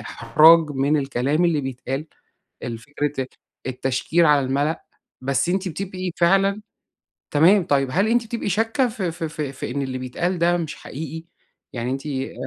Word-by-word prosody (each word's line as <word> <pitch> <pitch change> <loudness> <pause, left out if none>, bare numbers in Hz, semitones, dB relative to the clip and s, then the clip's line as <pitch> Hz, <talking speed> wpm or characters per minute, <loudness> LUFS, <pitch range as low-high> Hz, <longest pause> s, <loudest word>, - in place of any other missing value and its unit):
إحراج 155 +7 +5
من 140 +2 +1
الكلام 140 +3 0
اللي 165 -4 +2
بيتقال؟ 135 +2 -4 0.6
الفكرة 145 +5 -3
ال - - -6 0.4
التشكيل 130 +6 +1
على 145 -3 +4
الملأ، 145 +4 -1 0.4
بس 135 +5 0
أنتِ 190 +1 0
بتبقِي 185 +2 -4
فعلًا 195 +4 +3 0.7
تمام 175 +7 +5
طيّب 135 -3 +1
هل 195 +8 +2
أنتِ 235 +1 +2
بتبقِي 230 -2 -3
شاكَّة 225 - +1
في 195 -7 -3
في 165 -1 -4
في 150 -3 -4
في 130 - -6
إن 140 +2 -2
اللي 130 -1 -3
بيتقال 175 +8 -2
ده 175 +1 +3
مش 160 -2 -4
حقيقي 160 +3 -7 0.5
يعني 120 +1 -3
أنتِ 135 +3 -4
آآ 135 -2 -3
155 Hz, 160 wpm, -22 LUFS, 135-180 Hz, 0.7 s, إحراج